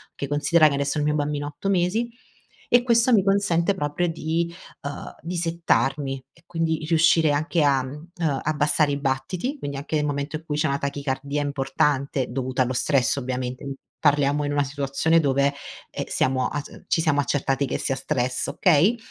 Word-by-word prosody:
che 140 - -4
considera 150 +2 +4
che 145 - 0
adesso 140 +2 -1
il 150 - +1
mio 150 - +2
bambino 145 -1 -1
ha 145 - -4
8 195 - -3
mesi 195 +6 +1 0.6
e 245 - +7
questo 235 0 +3
mi 205 - +6
consente 195 -2 +2
proprio 150 +2 -1
di, 165 +1 -1 0.3
ehm, 140 +1 -7
di 175 +3 -5
settarmi 140 -5 0
e 165 - -24
quindi 165 -2 -1
riuscire 165 -2 +4
anche 155 +2 +1
a, 135 -3 +3
mhmm 150 +5 -9
ehm, 150 -6 0
abbassare 150 0 +2
i 140 - -2
battiti 150 - -2
quindi 140 -1 -4
anche 145 +3 -4
nel 150 - 0
momento 145 +1 -2
in 160 - -15
cui 150 -2 -2
c'è 155 +1 +2
una 140 0 0
tachicardia 140 0 -2
importante 140 -1 0
dovuta 130 0 -2
allo 125 - -2
stress 135 +1 +1
ovviamente, 130 +1 -4 0.2
parliamo 145 0 +2
in 145 - -2
una 145 0 +2
situazione 140 +3 +1
dove, 140 -1 +2 0.4
emh, - - -4
siamo 130 -1 +1
a 145 - -3
c - - -13
ci 165 - +2
siamo 155 -3 +2
accertati 140 -1 0
che - - -2
sia 135 - -1
stress, 130 -2 -1
okay? 180 +7 +3
145 Hz, 185 wpm, -24 LUFS, 140-165 Hz, 0.6 s, e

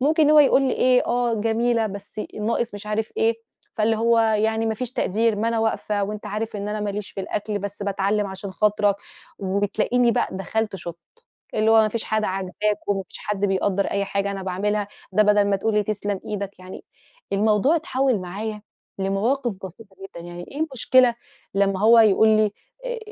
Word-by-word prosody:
ممكن 305 +2 +3
هو 305 - +7
يقول 275 -1 +5
لي 260 - +1
إيه، 250 0 +3
آه 240 -1 +1
جميلة، 225 +1 +1
بس 200 +1 -7
ناقص 225 +1 -1
مش 205 +1 -8
عارف 215 +1 -2
إيه. 225 +1 +2 0.4
فاللي 220 +1 +2
هو 230 0 +3
يعني 220 0 +1
ما 220 - 0
فيش 250 +1 -5
تقدير 220 +2 +1
ما 225 +2 0
أنا 230 -1 0
واقفة، 210 -2 0
وأنت 210 +1 -6
عارف 210 +1 -4
إن 200 +1 -4
أنا 210 0 -3
ما 205 -1 -2
ليش 205 0 -5
في 195 - -6
الأكل 210 +1 -3
بس 205 +1 -5
باتعلّم 200 +1 0
عشان 190 +1 -7
خاطرك، 205 +1 +2 0.4
وبتلاقيني 205 +5 +1
بق - - 0
دخلت 195 +3 -2
شُطت، 170 -2 -7 0.6
اللي 220 +1 +2
هو 225 - +7
ما 215 - +2
فيش 225 +1 -3
حاجة 215 -1 0
عاجباك، 195 +3 -2
وما 195 -1 0
فيش - - -9
حد 210 -2 -4
بيقدّر 195 +1 0
أي 200 0 -1
حاجة 200 0 -1
أنا 195 -1 -5
باعملها، 205 +2 -1 0.2
ده 215 +3 +5
بدل 210 0 +4
ما 195 - +3
تقول 215 +2 -1
لي 210 - +3
تسلم 205 -1 -2
إيدك، 200 -2 -5
يعني 185 - -10 0.5
الموضوع 215 +9 +3
اتحوّل 270 - 0
معايا 210 +4 -5 0.4
لمواقف 215 +5 0
بسيطة 195 +2 -11
جدًا، 170 -3 -10
يعني 175 0 -8
إيه 285 - -7
المشكلة 255 -4 +3 0.4
لما 195 -1 +1
هو 230 +2 +6
يقول 220 0 +5
لي 215 -1 +3 0.3
آآ - - -3
210 Hz, 190 wpm, -23 LUFS, 200-225 Hz, 0.6 s, هو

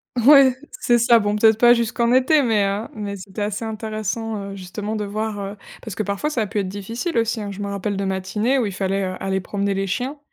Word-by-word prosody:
Ouais 265 +1 +6 0.2
c'est 240 - +3
ça, 235 0 +5
bon, 205 -1 0
peut-être 220 0 +4
pas 240 0 +7
jusqu'en 235 0 0
été 260 +4 +4
mais, 220 -6 +2
heu, 200 +3 -2
mais 205 -2 -5
c'était 195 +2 -6
assez 210 +2 -3
intéressant 215 -1 -4
justement 200 +3 -5
de 210 -1 -2
voir, 210 +1 -3
heu, 200 +1 -6 0.3
parce 220 - -6
que - - -2
parfois, 200 +8 -2
ça 250 - 0
a 215 - -1
pu 205 - -5
être 195 - -1
difficile 225 - -4
aussi, 230 0 0
hein. 205 -1 -5
Je 195 - -9
me 200 - -3
rappelle 200 0 -3
de 200 - -2
matinées 195 +7 0
où 250 - +1
il 205 - -3
fallait, 195 +1 -1
heu, 185 0 -3
aller 190 0 -1
promener 200 +1 -2
les 195 0 -1
chiens, 255 +9 -3
210 Hz, 240 wpm, -21 LUFS, 200-230 Hz, 0.3 s, pas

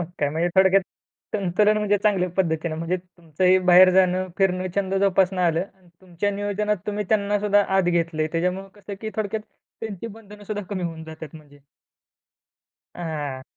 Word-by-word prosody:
मग - - -1
काय 145 - +1
म्हणजे 165 +4 0
थोडक्यात 190 0 +5 0.5
संतुलन 205 +2 +2
म्हणजे 205 -1 +2
चांगल्या 195 -4 +2
पद्धतीने 160 -3 0
म्हणजे 165 +3 -2
तुमचंही 180 0 0
बाहेर 185 0 +7
जाणं, 185 0 +3
फिरणं, 185 -1 +1
छंद 195 -1 0
जोपासणं 190 -1 +2
आलं 170 +1 +1
आणि 185 -2 -25
तुमच्या 185 +2 -3
नियोजनात 205 +1 -1
तुम्ही 210 0 -2
त्यांनासुद्धा 205 -1 +2
आत 195 - +4
घेतलय. 165 -3 0
त्याच्यामुळे 180 +3 -1
कसं, 205 0 -9
की 220 -1 -4
थोडक्यात 215 0 -2 0.4
त्यांची 220 -1 -6
बंधनंसुद्धा 210 -1 -8
कमी 190 -3 -4
होऊन 165 -2 -5
जातात 160 -1 -10
म्हणजे. 145 -2 -17 1.4
हां. 150 -6 -4
185 Hz, 150 wpm, -23 LUFS, 170-205 Hz, 1.4 s, बाहेर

